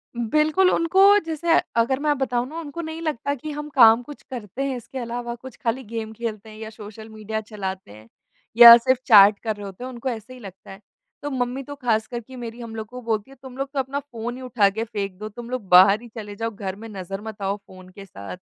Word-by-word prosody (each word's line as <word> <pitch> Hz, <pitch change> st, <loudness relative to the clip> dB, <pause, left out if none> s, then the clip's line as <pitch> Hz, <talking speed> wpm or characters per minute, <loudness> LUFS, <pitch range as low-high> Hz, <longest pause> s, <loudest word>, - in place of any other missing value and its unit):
बिल्कुल 305 Hz, +10 st, +2 dB
उनको 355 Hz, +4 st, +3 dB, 0.2 s
जैसे 330 Hz, +1 st, 0 dB, 0.2 s
अगर 235 Hz, +4 st, +2 dB
मैं 295 Hz, -1 st, +1 dB
बताऊँ 250 Hz, -2 st, -1 dB
ना 320 Hz, +4 st, -7 dB
उनको 330 Hz, +2 st, -6 dB
नहीं 320 Hz, 0 st, -6 dB
लगता 285 Hz, -3 st, -2 dB
कि 300 Hz, +4 st, -7 dB
हम 295 Hz, +1 st, -6 dB
काम 230 Hz, -2 st, +7 dB
कुछ 290 Hz, +3 st, -11 dB
करते 240 Hz, +2 st, -5 dB
हैं 275 Hz, -1 st, -2 dB
इसके 245 Hz, +3 st, -10 dB
अलावा 240 Hz, 0 st, -4 dB
कुछ 260 Hz, +1 st, -12 dB
खाली 240 Hz, +3 st, -1 dB
गेम 225 Hz, -1 st, -6 dB
खेलते 220 Hz, -2 st, -6 dB
हैं 215 Hz, -, -12 dB
या 220 Hz, 0 st, -7 dB
सोशल 215 Hz, 0 st, -11 dB
मीडिया 220 Hz, 0 st, -5 dB
चलाते 190 Hz, -, -6 dB
हैं, 110 Hz, +1 st, -15 dB, 0.5 s
या 235 Hz, -1 st, +12 dB
सिर्फ 255 Hz, +2 st, +1 dB
चैट 205 Hz, -2 st, +7 dB
कर 220 Hz, -2 st, -2 dB
रहे 205 Hz, -, -9 dB
होते 195 Hz, +4 st, -9 dB
हैं 255 Hz, -, -5 dB
उनको 250 Hz, +2 st, -4 dB
ऐसे 230 Hz, +1 st, -7 dB
ही 255 Hz, -, -12 dB
लगता 195 Hz, -5 st, -12 dB
है। 195 Hz, -, -11 dB, 0.4 s
तो 290 Hz, -, -4 dB
मम्मी 255 Hz, +1 st, -2 dB
तो 285 Hz, +2 st, -9 dB
खास 230 Hz, -5 st, 0 dB
करके 240 Hz, +1 st, -8 dB
मेरी 235 Hz, -1 st, -8 dB
हम 230 Hz, -1 st, -8 dB
लोग 220 Hz, -1 st, -6 dB
को 250 Hz, +2 st, -9 dB
बोलती 225 Hz, +1 st, -3 dB
है -, -, -14 dB
तुम 260 Hz, -1 st, -11 dB
लोग 275 Hz, 0 st, -3 dB
तो 275 Hz, -, -1 dB
अपना 270 Hz, +2 st, -2 dB
फ़ोन 240 Hz, -3 st, -7 dB
ही 260 Hz, -, -10 dB
उठा 230 Hz, -6 st, +2 dB
के 220 Hz, +3 st, -3 dB
फेंक 200 Hz, -5 st, -5 dB
दो, 215 Hz, -, -6 dB
तुम 235 Hz, +3 st, -10 dB
लोग 250 Hz, -6 st, -5 dB
बाहर 195 Hz, +4 st, +7 dB
ही 240 Hz, -, -11 dB
चले 210 Hz, -2 st, -7 dB
जाओ 225 Hz, +2 st, -3 dB
घर 195 Hz, -2 st, -6 dB
में 225 Hz, +3 st, -10 dB
नज़र 195 Hz, -1 st, -6 dB
मत 215 Hz, -2 st, -9 dB
आओ 195 Hz, +1 st, -1 dB
फ़ोन 185 Hz, -2 st, -16 dB
के 195 Hz, +1 st, -12 dB
साथ। 100 Hz, -, -9 dB
230 Hz, 245 wpm, -23 LUFS, 210-260 Hz, 0.5 s, या